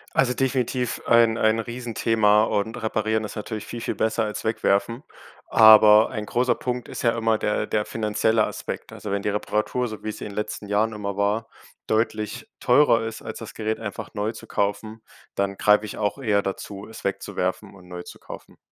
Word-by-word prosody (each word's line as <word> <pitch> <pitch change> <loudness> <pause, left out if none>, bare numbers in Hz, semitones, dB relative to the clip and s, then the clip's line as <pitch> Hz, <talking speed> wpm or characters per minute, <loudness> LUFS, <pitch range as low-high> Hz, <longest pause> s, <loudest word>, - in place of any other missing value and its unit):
Also 125 -2 +3
definitiv 125 -2 -1
ein 115 -1 +4
ein 110 +1 +3
Riesenthema 115 -2 +2
und 110 +2 -1
Reparieren 110 0 0
ist 105 - -6
natürlich 110 0 -5
viel, 120 - -7
viel - - -3
besser 110 0 0
als 105 -1 -4
Wegwerfen. 115 +2 0 0.5
Aber 110 0 +8
ein 110 -4 -5
großer 125 +1 +2
Punkt 125 -1 -4
ist - - -6
ja 115 -1 +2
immer 110 -1 +1
der 105 - 0
der 105 -1 0
finanzielle 110 0 +1
Aspekt. - - -6
Also - - -7
wenn 100 0 -1
die - - 0
Reparatur, 105 +4 -1
so 110 -2 -8
wie 110 - -3
es - - -7
in - - -4
den 100 - -10
letzten 105 -1 -4
Jahren 105 +2 +1
immer 100 -2 -5
war, 105 +3 0 0.4
deutlich 110 -1 -1
teurer 120 -6 +4
ist 110 0 -7
als 110 - -7
das 115 - -9
Gerät 110 0 -2
einfach 100 -3 -6
neu 105 +1 -1
zu - - -11
kaufen, 105 +2 -2 0.3
dann 100 0 -1
greife 105 +1 +4
ich 105 - -7
auch 105 +5 -1
eher 105 -6 +1
dazu, 100 +1 -6
es 110 - -11
wegzuwerfen 100 - -3
und 90 -2 -16
neu 90 -1 -7
zu - - -12
kaufen. - - -11
110 Hz, 190 wpm, -24 LUFS, 105-115 Hz, 0.5 s, Aber